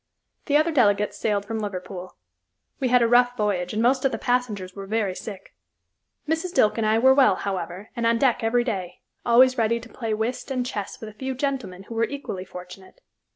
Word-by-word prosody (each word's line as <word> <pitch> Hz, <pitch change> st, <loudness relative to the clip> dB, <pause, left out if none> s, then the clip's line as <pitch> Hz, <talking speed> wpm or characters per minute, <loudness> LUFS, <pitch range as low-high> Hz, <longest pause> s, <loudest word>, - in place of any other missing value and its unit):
The 290 Hz, -, +4 dB
other 310 Hz, +2 st, +2 dB
delegates 210 Hz, -7 st, +2 dB
sailed 205 Hz, -2 st, -1 dB
from 225 Hz, +1 st, -3 dB
Liverpool. 185 Hz, -3 st, -6 dB, 0.6 s
We 265 Hz, -, +1 dB
had 250 Hz, -1 st, +4 dB
a -, -, +4 dB
rough 245 Hz, +1 st, +4 dB
voyage 190 Hz, -4 st, 0 dB
and 220 Hz, +1 st, 0 dB
most 255 Hz, +2 st, +3 dB
of 270 Hz, -, +2 dB
the 225 Hz, -, -2 dB
passengers 220 Hz, -7 st, -1 dB
were 195 Hz, -1 st, -7 dB
very 210 Hz, -2 st, 0 dB
sick. 200 Hz, +1 st, -9 dB, 0.7 s
Mrs. 325 Hz, +3 st, -2 dB
Dilke 215 Hz, +2 st, +3 dB
and 220 Hz, -, +1 dB
I 215 Hz, +1 st, +3 dB
were 260 Hz, +3 st, +6 dB
well, 270 Hz, -1 st, +5 dB
however, 195 Hz, +1 st, -5 dB
and 235 Hz, -1 st, 0 dB
on 230 Hz, 0 st, +3 dB
deck 245 Hz, -2 st, +2 dB
every 240 Hz, +2 st, +2 dB
day, 190 Hz, -7 st, -4 dB, 0.3 s
always 255 Hz, +2 st, +5 dB
ready 230 Hz, +1 st, +2 dB
to 235 Hz, +1 st, -12 dB
play 225 Hz, -3 st, -3 dB
whist 225 Hz, +6 st, -3 dB
and 255 Hz, -2 st, -1 dB
chess 205 Hz, -5 st, -5 dB
with 220 Hz, -, -7 dB
a -, -, -13 dB
few 260 Hz, +4 st, -4 dB
gentlemen 250 Hz, -9 st, -3 dB
who 230 Hz, -, -9 dB
were 230 Hz, 0 st, +2 dB
equally 250 Hz, -10 st, -6 dB
fortunate. 180 Hz, -, -12 dB
225 Hz, 205 wpm, -24 LUFS, 200-250 Hz, 0.7 s, were